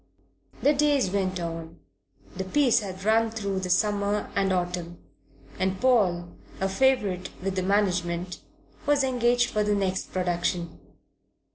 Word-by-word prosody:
The 290 - +5
days 285 -8 +2
went 190 -2 -1
on. 165 -1 -6 0.6
The 190 - -3
piece 245 +3 +3
had 190 -3 -7
run 225 +2 +3
through 200 -4 -3
the 185 -1 -4
summer 205 +2 +1
and 195 -1 +2
autumn, 175 -1 -2 0.6
and 190 0 0
Paul, 190 -9 +2 0.3
a 195 - +1
favourite 200 -4 +1
with 195 0 -2
the 185 - 0
management, 180 -2 0 0.5
was 290 -1 +3
engaged 245 -1 +2
for 210 - +1
the 210 0 +1
next 190 -2 -1
production. 175 -2 -2
195 Hz, 135 wpm, -26 LUFS, 180-225 Hz, 0.6 s, The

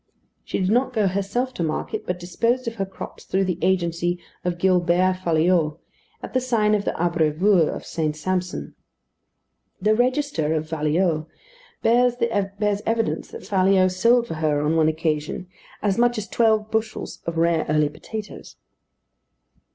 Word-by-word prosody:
She - - -3
did 185 +1 0
not 250 +4 +2
go 215 -2 +2
herself 200 +7 -1
to 180 - -5
market, 155 -2 -3
but 180 - -1
disposed 230 +8 -1
of 230 0 -4
her 195 -1 -2
crops 190 - -9
through 190 0 0
the 180 -2 -2
agency 175 -1 +1 0.3
of 180 -1 -1
Guilbert 185 0 +2
Falliot, 165 -2 +2 0.5
at - - -7
the 255 - +2
sign 225 -4 +2
of 205 -1 +1
the - - 0
Abreveurs 170 +1 +2
of - - -6
St. 155 -2 -2
Sampson. 180 +3 -3 1.1
The 210 +3 +3
register 245 - +1
of 155 0 -2
Falliot 155 +1 0 0.6
bears 245 +1 +4
evidence 210 0 -1
that - - -10
Falliot 190 -1 +3
sold 235 +6 +3
for 235 - -5
her, 150 -2 +1
on 155 +2 +1
one 160 -1 +4
occasion, 155 +1 -1 0.4
as 205 +1 +1
much 240 0 +3
as 215 0 -4
twelve 220 -2 +2
bushels 220 0 -3
of 165 -1 -2
rare 165 -1 +2
early 150 -1 +3
potatoes. 215 +7 -8
185 Hz, 150 wpm, -23 LUFS, 165-215 Hz, 1.1 s, bears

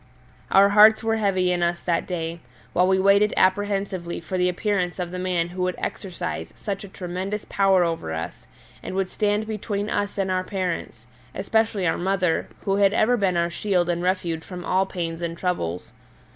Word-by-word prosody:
Our 200 +1 +6
hearts 215 +2 +7
were 225 0 +1
heavy 190 -4 +1
in 175 -1 0
us 175 0 +1
that 170 -2 -1
day, 170 -2 -3 0.3
while 180 +1 +3
we 190 0 +3
waited 200 +2 +4
apprehensively 195 -2 0
for 170 +3 -6
the 180 0 +2
appearance 180 -1 -1
of 175 -2 -3
the 180 - -5
man 180 -2 0
who 180 +1 -6
would 180 0 0
exercise 80 - -5
such 200 0 -4
a - - -8
tremendous 190 +3 -5
power 195 -2 +3
over 165 - -2
us 80 +1 -6 0.3
and - - -6
would 190 -1 0
stand 210 +1 0
between 210 -1 -3
us 205 0 -1
and 190 -1 0
our 185 0 0
parents, 180 - -4 0.3
especially 215 -1 +1
our 165 - +1
mother, 185 -2 0 0.2
who 195 0 +1
had 200 +1 +4
ever 235 +3 +4
been 195 -6 +1
our 170 0 +1
shield 180 -2 0
and 175 0 0
refuge 175 -3 -1
from 180 -2 -8
all 190 +1 +2
pains 165 -3 -4
and 170 0 -3
troubles. 90 - -2
185 Hz, 185 wpm, -24 LUFS, 175-200 Hz, 0.3 s, hearts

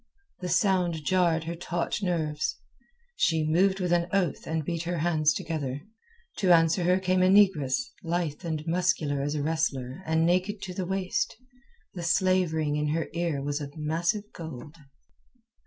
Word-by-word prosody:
The 180 - -4
sound 175 -4 +1
jarred 170 -3 +2
her 165 +1 -4
taut 175 +3 -3
nerves. 160 -5 -1 0.6
She 160 -2 +1
moved 190 +5 +3
with 180 -2 0
an 170 0 +2
oath 190 -6 0
and 160 -1 -2
beat 170 -1 -2
her 175 +1 -2
hands 155 -2 +2
together. 150 -6 -3 0.6
To 185 -3 +3
answer 165 +1 +4
her 180 +1 +4
came 185 0 +1
a 185 - +5
negress, 195 - +3
lithe 170 -3 -2
and 160 -2 -3
muscular 165 -5 0
as 145 +2 -2
a 145 - -1
wrestler 150 -2 -1
and 160 0 +2
naked 185 +4 +1
to 185 - -5
the 180 -1 -3
waist; 190 +2 -1 0.6
the 175 - -6
slave 185 +1 +2
ring 155 -2 0
in 150 0 0
her 165 - -2
ear 165 -5 -1
was 145 +1 -2
of 145 +1 -8
massive 165 +6 0
gold. 155 -2 -8
170 Hz, 165 wpm, -27 LUFS, 155-180 Hz, 0.6 s, a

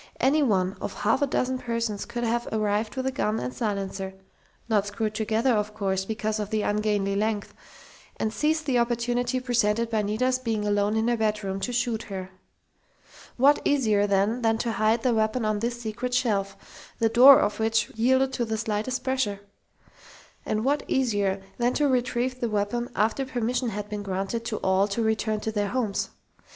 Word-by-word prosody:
Any 290 +4 +3
one 190 -7 +1
of - - -4
half - - +1
a 285 - +3
dozen 260 -1 -1
persons 230 -4 -2
could 240 0 -4
have 235 +1 0
arrived 215 +1 0
with 260 0 -2
the 265 - +1
gun 220 -4 -1
and 125 0 -4
silencer 195 - -3 0.5
not 210 -3 +1
screwed 210 +1 -2
together, 220 +4 +1
of 210 -1 -1
course, 190 -2 -1
because 215 0 -2
of 210 -1 -3
the 215 -1 0
ungainly 205 -1 0
length 210 0 -1 0.6
and 220 0 -1
seized 315 +3 0
the 255 -4 +2
opportunity 240 +1 0
presented 235 -2 +1
by 220 -1 +2
Nita's 250 +5 0
being 225 -4 -2
alone 205 +1 +1
in 220 +1 +1
her 240 -1 +2
bedroom 210 -3 -1
to 245 - -3
shoot 240 -2 0
her. 190 -1 -6 1.1
What 280 +4 +5
easier, 215 -8 +2
then, 200 +5 +1
than 225 -1 +2
to 230 +1 -1
hide 220 +1 +1
the 250 - +3
weapon 220 +2 +1
on 215 -1 0
this 235 +2 -2
secret 240 +2 -3
shelf, 200 -6 0 0.4
the 225 - +2
"door" 250 +5 +9
of 205 +1 0
which 225 0 +1
yielded 260 +4 +2
to 255 -2 -1
the 220 -1 -2
slightest 220 +3 -2
pressure? 255 -7 -1 1.1
And 215 +2 -1
what 285 +2 +2
easier 205 -7 0 0.2
than 245 +1 +1
to 295 - +2
retrieve 250 0 0
the 235 - -1
weapon 215 +3 -1
after 220 +6 +1
permission 245 -1 -1
had 210 -1 -5
been 210 -1 -5
granted 195 +4 -3
to 220 -2 -2
all 190 +1 +3
to 210 +3 -1
return 220 -1 0
to 220 - -2
their 205 -1 -1
homes? 220 -3 -1
220 Hz, 185 wpm, -26 LUFS, 210-245 Hz, 1.1 s, door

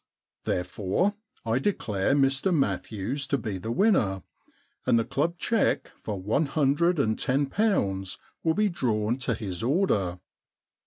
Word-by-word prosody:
There 90 - 0
fore 105 - 0 0.3
I 115 +2 +1
declare 115 - 0
Mr 135 +5 +2
Matthews 120 - -1
to 140 - +1
be 110 -6 -4
the 110 +6 -4
winner, 115 - +2 0.6
and - - +5
the 115 - +1
club 170 +5 -1
cheque 225 +2 +1
for 105 -3 -4
one 110 +11 +1
hundred 155 +5 +2
and 110 -6 +1
ten 135 +3 +1
pounds 100 - 0 0.3
will 160 -1 +2
be 210 +2 +3
drawn 120 - 0
to 135 - 0
his 95 -6 -5
order.' 115 - +1
130 Hz, 145 wpm, -27 LUFS, 100-160 Hz, 0.6 s, and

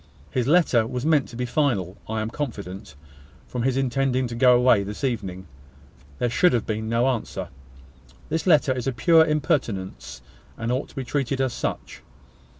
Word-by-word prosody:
His 125 -1 0
letter 140 -8 +3
was 125 +3 -4
meant 155 -4 +3
to 120 - -11
be 125 +1 -2
final, 120 - 0
I 110 0 -1
am 110 +1 -3
confident, 100 - -6 0.5
from 125 - -4
his 130 +1 +1
intending 130 0 +1
to - - -6
go 125 +1 +5
away 120 -4 +4
this 105 +4 -7
evening. 95 -8 -3 0.7
There 120 - 0
should 150 +8 +3
have 120 -3 0
been 110 0 -3
no 115 +2 +2
answer. 125 -4 -3 0.8
This 165 +3 -2
letter 155 -5 +5
is 130 0 -2
a 135 - 0
pure 160 +6 +5
impertinence, 130 -11 -2 0.3
and 115 +1 -2
ought 130 +3 -2
to - - -18
be 135 - -3
treated 135 +1 -2
as 130 -2 0
such. - - -5
125 Hz, 175 wpm, -24 LUFS, 110-135 Hz, 0.8 s, go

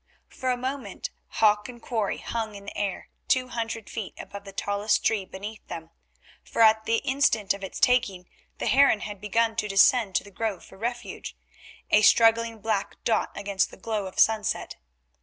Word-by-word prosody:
For 260 - -3
a 250 - +1
moment 255 -4 -4 0.2
hawk 210 0 +2
and 240 -1 -10
quarry 225 -4 -2
hung 220 -2 -4
in 200 0 -10
the - - -8
air 200 -3 -3 0.2
two 255 -1 +2
hundred 225 -2 -4
feet 220 -5 -6
above 200 0 -9
the 195 - -8
tallest 205 +2 0
tree 210 -4 +2
beneath 205 +4 -8
them, 165 -1 -8 0.5
for 230 - +2
at 220 0 +5
the 230 - +2
instant 260 -7 +2
of 200 0 -9
its 190 - -6
taking 210 -8 +2 0.3
the - - -4
heron 275 -6 +5
had 205 -2 -7
begun 225 +2 +1
to 210 - 0
descend 195 +1 +4
to - - +2
the 200 - -14
grove 210 -1 -3
for - - -15
refuge, 240 +4 -5 0.5
a 210 - +6
struggling 230 +1 +5
black 210 -2 -2
dot 230 - +1
against 200 -1 0
the - - -13
glow 215 -3 -3
of 185 - -11
sunset. 220 -1 +2
220 Hz, 180 wpm, -26 LUFS, 200-230 Hz, 0.5 s, a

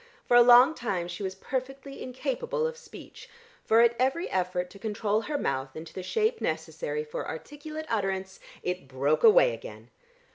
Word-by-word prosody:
For 240 - +3
a 240 - +9
long 245 +5 +8
time 200 - -3
she 175 +3 -7
was 190 -1 -3
perfectly 270 +5 -5
incapable 295 - -2
of 475 0 -2
speech, 485 - -13 0.3
for 225 +1 +4
at 235 0 +4
every 265 +7 +1
effort 180 -1 -1
to 200 - -13
control 215 0 -1
her 290 +5 -3
mouth 135 - -2
into 160 +1 -9
the 185 - -5
shape 445 - 0
necessary 460 -2 -3
for 485 +2 -6
articulate 310 +2 -7
utterance, 190 -3 -2 0.2
it 180 -5 -3
broke 140 +4 0
away 215 - +7
again. 110 0 -10
230 Hz, 170 wpm, -28 LUFS, 180-290 Hz, 0.3 s, a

